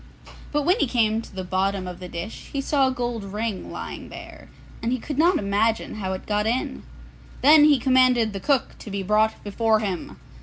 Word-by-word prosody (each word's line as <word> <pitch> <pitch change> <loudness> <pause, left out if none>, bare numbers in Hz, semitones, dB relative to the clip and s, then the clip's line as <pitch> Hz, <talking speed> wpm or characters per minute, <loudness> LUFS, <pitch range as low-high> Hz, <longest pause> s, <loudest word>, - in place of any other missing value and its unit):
But 295 0 0
when 360 +9 +2
he - - +2
came 225 -2 +1
to 210 - -14
the 190 - -4
bottom 190 +1 -1
of 180 -1 -7
the 180 - -7
dish 170 +7 -7
he 280 - -2
saw 275 0 +2
a - - +1
gold 240 -3 -3
ring 210 +1 -4
lying - - -7
there, - - -11 0.3
and 230 - -1
he 255 - +1
could 290 +3 -5
not 345 +2 +4
imagine 210 +3 0
how 190 -3 -3
it 185 - -6
got 210 0 0
in. 245 +3 -1 0.6
Then 295 +2 +8
he 295 -2 +6
commanded 255 -3 +3
the 195 - -4
cook 275 +4 0
to - - -9
be 200 -1 -3
brought 215 +3 +1
before 220 +2 +1
him. 195 -5 -4
220 Hz, 205 wpm, -24 LUFS, 200-260 Hz, 0.6 s, Then